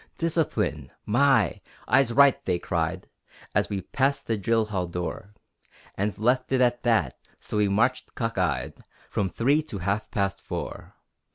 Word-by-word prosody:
Discipline! 165 -1 -1 0.2
My! 120 - +3 0.3
"Eyes 135 -4 +4
right!" 140 +2 +5
they 90 -2 +1
cried, 85 +1 -2 0.5
As - - +1
we 100 -2 -2
passed 135 +9 0
the 115 - 0
drill 110 +2 +1
hall 95 -4 -2
door, 90 +4 -5 0.6
And 100 +2 -2
left 125 +5 +1
it 130 - +3
at 120 -1 +2
that 110 - +1 0.2
so - - -4
we 105 -1 +3
marched 115 +6 0
cock 115 -1 -2
eyed 90 -2 -1 0.3
From 95 -2 0
three 140 - +2
to 140 -9 -7
half 100 +3 -2
past 100 -1 -1
four. - - -6
110 Hz, 155 wpm, -26 LUFS, 95-130 Hz, 0.6 s, right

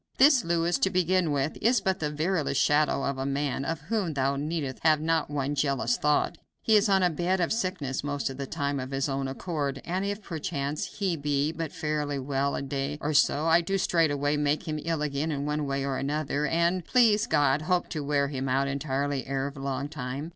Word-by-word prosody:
This 270 -1 +6
Louis, 170 0 +1
to 190 - +2
begin 185 -2 +2
with, 140 +1 -1
is 235 +2 +4
but 190 -1 -1
the 150 - -1
veriest 155 -2 0
shadow 145 0 +2
of 140 -1 -2
a 135 - -2
man, 140 -1 -1
of 165 +2 -3
whom 180 -1 -2
thou 135 0 +1
needst 145 -2 -3
have 155 -2 +4
not 160 -1 0
one 145 -1 -1
jealous 135 -4 +1
thought. 150 0 +1 0.2
He 220 - +4
is 210 +1 +4
on 190 -1 +4
a 180 - +4
bed 175 +4 0
of 175 - +1
sickness 185 - -2
most 145 -1 -2
of 135 - -5
the 140 -1 -4
time, 140 -2 -2
of 130 0 -5
his 135 0 -1
own 135 -1 -2
accord, 140 -1 -3
and 185 +3 -1
if, 205 +1 -3
perchance, 150 -4 -3
he 190 -4 -2
be 145 0 0
but 165 -2 -4
fairly 150 -3 -2
well 140 +1 -1
a - - -3
day 140 +1 -3
or 150 0 -2
so, 150 +1 +3
I 165 +1 +5
do 195 +3 -1
straightway 150 -5 +1
make 150 +3 0
him 155 -1 -2
ill 165 -2 -1
again 150 +2 -1
in 140 -1 -2
one 150 0 -1
way 140 0 -1
or 135 -1 -1
another, 145 +1 -1
and, 170 +4 +1
please 225 0 +3
God, 145 - +2
hope 180 +2 0
to 150 - -3
wear 140 -1 +1
him 135 -2 -3
out 135 +2 +2
entirely 140 0 -2
ere 135 +1 -2
long 135 0 -3
time. 140 +1 -5
150 Hz, 215 wpm, -27 LUFS, 140-170 Hz, 0.2 s, This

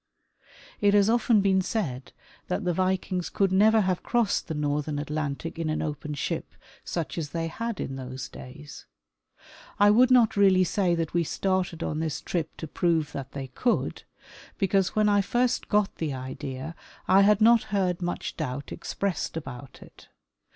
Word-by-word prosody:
It 205 0 +4
has 205 +1 +5
often 235 -2 +3
been 190 -1 +3
said 155 - -3 0.4
that 185 +3 -2
the 180 -1 0
Vikings 185 0 -1
could 195 -2 +1
never 215 +3 +5
have 185 -2 0
crossed 235 -4 0
the 160 - -3
northern 150 0 -1
Atlantic 150 +2 -4
in 165 -1 -1
an 155 - -1
open 150 0 -4
ship - - -4 0.3
such 170 0 -3
as 150 -3 -4
they 165 +1 -2
had 230 +5 -4
in 135 - -4
those 130 -3 -6
days. 145 +4 -11 0.9
I 205 0 +6
Avould 250 +4 +5
not 245 -4 +5
really 190 -2 +5
say 180 -1 +1
that 165 -2 -3
we 170 0 +2
started 180 -1 -1
on 155 - -2
this 160 -2 -2
trip 165 -3 -3
to 160 - -6
prove 160 -1 0
that 135 -1 -7
they 135 -2 -6
could, 240 - -1 0.6
because 195 -2 +1
when 215 0 +3
I 205 -1 +4
first 245 +5 0
got 210 -2 +1
the 155 -4 -2
idea 130 +3 -6 0.3
I 190 +1 +6
had 205 0 +5
not 230 +1 +5
heard 185 -3 0
much 175 0 -3
doubt 140 -3 -4
expressed 180 0 -3
about 130 -3 -8
it. - - -18
175 Hz, 170 wpm, -27 LUFS, 150-200 Hz, 0.9 s, I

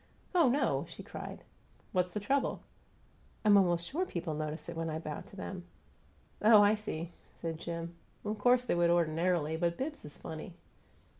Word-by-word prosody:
"Oh, 335 -7 +5
no!" 275 +4 +1
she - - -9
cried. - - -8 0.5
"What's 180 -1 +1
the 210 - -2
trouble?" 270 +6 0 0.8
"I'm 210 -1 +7
almost 175 -3 +4
sure 330 - -1
people 170 - -3
notice 155 +1 -4
it - - -5
when 165 0 -2
I 155 - -2
bow 155 -2 -5
to - - -14
them." 190 -2 -6 0.8
"Oh, 215 -1 +8
I 205 +1 +6
see!" 175 -6 -4 0.3
said 165 -1 -3
Jim. 170 0 -4 0.3
"Of 210 0 -2
course 245 +3 +4
they - - +1
would 175 0 +3
ordinarily, 165 -1 +2
but 170 0 0
Bibbs 295 +3 -4
is 150 - -10
funny." 160 +2 -7
175 Hz, 170 wpm, -32 LUFS, 165-210 Hz, 0.8 s, Oh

